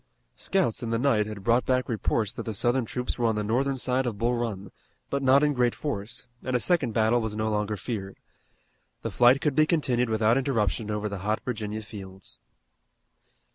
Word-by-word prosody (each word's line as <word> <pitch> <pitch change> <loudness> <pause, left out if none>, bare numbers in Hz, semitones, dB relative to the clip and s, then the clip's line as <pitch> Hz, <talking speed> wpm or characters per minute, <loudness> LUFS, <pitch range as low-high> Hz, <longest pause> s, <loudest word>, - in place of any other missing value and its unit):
Scouts 190 - 0
in 115 - -3
the 115 - +1
night 115 -5 +2
had 105 -2 -7
brought 120 +4 +3
back 130 -1 +1
reports 110 -2 0
that - - -5
the 110 - -2
Southern 120 +4 +1
troops 125 +2 -4
were 120 - +3
on 110 - +1
the 105 - -1
northern 130 +6 0
side 130 0 +1
of 110 -4 -3
Bull 120 +3 +1
Run, 105 -5 -3 0.4
but 140 - 0
not 135 +2 +5
in 150 -1 +3
great 125 -2 +1
force, 120 -6 -4 0.2
and 130 - -1
a - - +3
second 165 -5 +1
battle 110 +2 +3
was 110 -1 -3
no 110 0 -1
longer 105 0 -1
feared. 100 -2 -5 0.9
The - - -3
flight 125 +3 +5
could 150 - +1
be 155 +1 +4
continued 130 -8 +1
without 110 +3 +3
interruption 110 -6 0
over 105 0 -1
the 100 -2 -5
hot 105 +3 -1
Virginia 110 -3 -3
fields. 95 -2 -9
115 Hz, 200 wpm, -27 LUFS, 105-130 Hz, 0.9 s, not